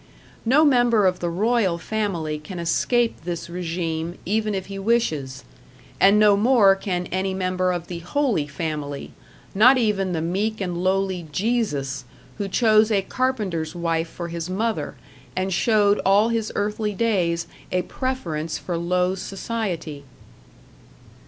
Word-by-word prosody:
No 280 +7 +5
member 240 -6 +4
of 185 -1 +2
the 175 - -1
Royal 200 0 +1
Family 170 -7 -2
can 175 +5 -8
escape 230 +8 +1
this 170 0 -5
regime 170 -1 -3
even 215 +1 0
if 190 -1 -3
he 195 0 -7
wishes; 195 - 0 0.6
and 200 +2 +6
no 210 -1 +6
more 210 -2 +5
can 185 -2 -3
any 190 +1 -1
member 185 -1 0
of 175 -1 -3
the 175 -1 -6
Holy 200 - 0
Family 145 -1 -4 0.4
not 245 +7 +6
even 205 -5 +1
the 165 - -1
meek 200 +6 -1
and 180 -3 -2
lowly 190 -2 0
Jesus, 145 - -1 0.3
who 200 - -1
chose 215 +1 +4
a 200 -2 +2
carpenter's 195 -10 -2
wife 165 -1 -1
for 170 0 -6
his 170 +1 -5
mother, 220 +4 -2 0.4
and 185 +1 -1
showed 205 +1 +3
all 200 +4 +4
his 225 -2 -1
earthly 210 0 -1
days 180 -7 +1 0.3
a 180 0 +1
preference 170 - -3
for 175 -2 -4
low 180 +2 +1
society. 190 -6 -4
190 Hz, 140 wpm, -23 LUFS, 170-215 Hz, 0.6 s, and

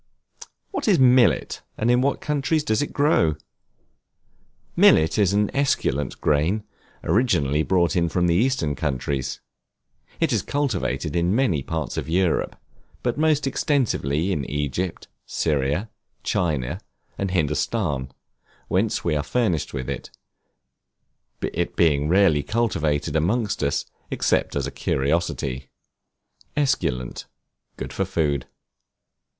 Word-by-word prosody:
What 385 - -3
is 200 -5 +5
Millet, 125 -3 +4 0.2
and 115 +2 +2
in 125 +1 +4
what 140 +1 0
countries 150 +1 0
does 110 -5 +1
it 145 - -2
grow? 140 - +2 1.4
Millet 80 +7 +5
is 100 -3 +4
an 105 0 +1
esculent 75 - 0
grain, 80 +9 +1 0.4
originally 85 - +2
brought 85 -1 +2 0.2
from 90 +1 +1
the 85 - +3
Eastern 105 - +1
countries. 70 -2 -2 0.8
It - - +1
is - - +2
cultivated 90 - -2
in 85 +3 +2
many 110 - +2
parts 80 +2 -4
of - - -3
Europe, 90 0 +1 0.5
but 120 +3 -1
most 155 -2 +2
extensively 100 - 0
in 75 -7 -1
Egypt, 75 +5 -3 0.2
Syria, 75 +6 0 0.4
China, 75 - -1 0.3
and 100 - -2
Hindostan, 75 - -1 0.6
whence 100 +4 +1
we 80 -3 +1
are 75 - +1
furnished 90 - 0
with 65 -1 -4
it, - - -5 1.3
it 85 +1 -2
being 75 -3 +2
rarely 90 -5 +4
cultivated 80 -7 -1
among 100 +10 +2 0.2
us, 70 -1 0 0.2
except - - 0
as 70 -2 0
a 70 - -4
curiosity. 70 -3 -1 0.9
Esculent, 65 - -1 0.5
good - - -6
for 95 - 0
food. 75 -8 -1
85 Hz, 120 wpm, -23 LUFS, 75-115 Hz, 1.4 s, is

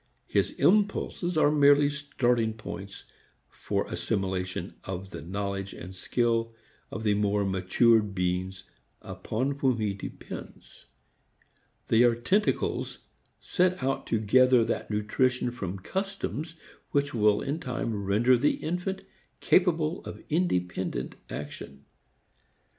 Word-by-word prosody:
His - - +1
impulses 200 -4 +1
are 150 -1 +5
merely 145 -1 +5
starting 125 -6 0
points 100 -3 -8 0.5
for - - -2
assimilation 95 -1 -2
of 95 +1 -6
the - - -7
knowledge 100 +3 -4
and 90 +2 -9
skill 115 +3 0 0.3
of 110 - -6
the 105 -2 +3
more 100 0 +1
matured 100 +3 +3
beings 90 +1 -2 0.4
upon 135 +5 -3
whom 130 -4 +2
he 105 -3 -1
depends. 95 - -9 1.0
They 115 - +4
are 120 -1 +5
tentacles 190 - 0 0.4
sent 180 -5 +1
out 135 +1 -1
to 115 - +1
gather 125 +3 +5
that 115 - -2
nutrition 120 +4 +1
from 100 -6 -5
customs 185 - -4 0.3
which 145 0 0
will 105 -2 +3
in 145 +4 -2
time 115 -7 -3
render 110 +6 +4
the 145 - +3
infant 180 +4 -3 0.4
capable 165 -2 +2
of - - -8
independent 90 - -1 0.2
action. 70 -1 -8
115 Hz, 115 wpm, -28 LUFS, 100-145 Hz, 1.0 s, are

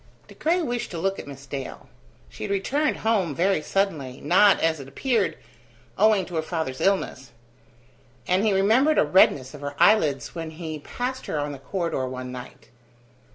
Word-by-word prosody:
De - - -13
Craye 345 +3 0
wished 245 -5 -3
to 170 - -6
look 195 +3 -1
at - - -8
Miss 140 -1 -10
Dale. 135 -1 -7 0.4
She 60 - -10
had - - -4
returned 265 +10 0
home 195 -10 +1
very 185 0 +2
suddenly, 150 -10 -1
not, 190 +6 +5
as 160 -1 +1
it 135 - -9
appeared, 240 - 0 0.6
owing 215 -3 +4
to 175 - -12
her - - +2
father's 160 -5 -4
illness; 135 -10 0 0.9
and 185 +3 +2
he 215 - +3
remembered 225 +11 +3
a - - +5
redness 145 -5 +4
of 145 - -10
her 140 0 -5
eyelids 150 - +3
when 165 -2 -5
he 160 -1 -6
passed 250 - -5
her - - -2
on 145 0 -2
the 140 - -8
corridor 165 -4 -2
one 130 0 -6
night. 125 -1 -10
165 Hz, 180 wpm, -25 LUFS, 140-200 Hz, 0.9 s, not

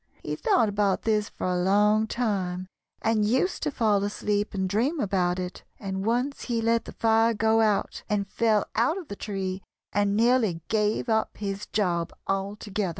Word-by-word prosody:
He - - -3
thought 390 - +2
about 200 -2 +1
this 215 -1 +1
for - - -6
a 180 -1 0
long 210 +3 +3
time, 190 -7 -1 0.4
and 220 -1 +2
used 260 - +1
to 305 - 0
fall 215 -7 +1
asleep 205 0 -1
and 190 -1 0
dream 245 - 0
about 185 -4 +1
it, 180 0 -5 0.2
and 190 -1 -4
once 245 +6 -1
he 235 -2 -1
let 230 0 +1
the - - -8
fire 225 0 +2
go 220 +1 +3
out, 210 -2 +1
and 205 -2 0
fell 215 0 +2
out 250 +10 +2
of 355 -7 -8
the 200 - -5
tree 195 -2 -4 0.3
and 205 0 +2
nearly 225 -7 +3
gave 215 +2 +1
up 220 -1 0
his 200 0 -4
job 175 -5 0
altogether." 200 0 -2
210 Hz, 175 wpm, -26 LUFS, 195-225 Hz, 0.4 s, long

